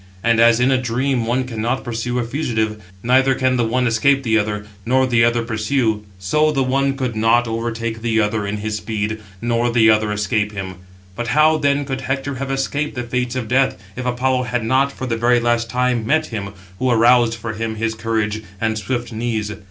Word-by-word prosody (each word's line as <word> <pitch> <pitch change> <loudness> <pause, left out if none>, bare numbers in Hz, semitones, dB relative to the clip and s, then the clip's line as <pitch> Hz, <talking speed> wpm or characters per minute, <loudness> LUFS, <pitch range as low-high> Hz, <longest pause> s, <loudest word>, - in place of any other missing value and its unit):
And 115 -1 +3
as 115 0 +5
in 125 +2 +3
a 130 -1 +2
dream 125 0 -1
one 125 +2 +1
cannot 120 +1 -2
pursue 120 0 -3
a 125 - 0
fugitive; 110 -5 -2 0.2
neither 130 +2 +3
can 130 0 +1
the 120 - +1
one 125 +3 +1
escape 135 +4 +2
the 110 -3 +1
other, 105 -1 -1 0.2
nor 130 +4 +2
the 120 -2 +3
other 120 0 +2
pursue: 110 0 0 0.2
so 150 +12 +1
the 135 -3 +1
one 135 +1 0
could 125 -4 -2
not 115 +2 +3
overtake 115 0 -3
the 115 -1 +1
other 105 -1 0
in 105 +1 -2
his 105 0 -3
speed, 110 0 -3 0.2
nor 120 0 +1
the 115 -2 +5
other 110 -1 +1
escape 105 0 -1
him. 95 -2 -6 0.4
But 120 +2 -4
how, 155 +1 +5
then, 140 0 +1
could 135 -1 -4
Hector 135 +1 -2
have 135 - -3
escaped 135 +2 -2
the 125 - -3
fates 125 +1 -2
of 125 -3 -3
death, 130 0 +2 0.2
if 130 - -4
Apollo 125 +1 0
had 120 -1 -2
not, 135 +4 +2
for 130 - -6
the 115 -3 -1
very 120 +1 +3
last 120 0 0
time, 125 0 0
met 155 +3 +2
him, 100 -5 -5 0.3
who 130 - +1
aroused 120 0 +4
for 115 -1 -5
him 110 0 -3
his 110 +1 -1
courage 110 -1 -2 0.2
and 110 0 -1
swift 120 +1 -3
knees? 110 -2 -2
120 Hz, 205 wpm, -19 LUFS, 110-130 Hz, 0.4 s, as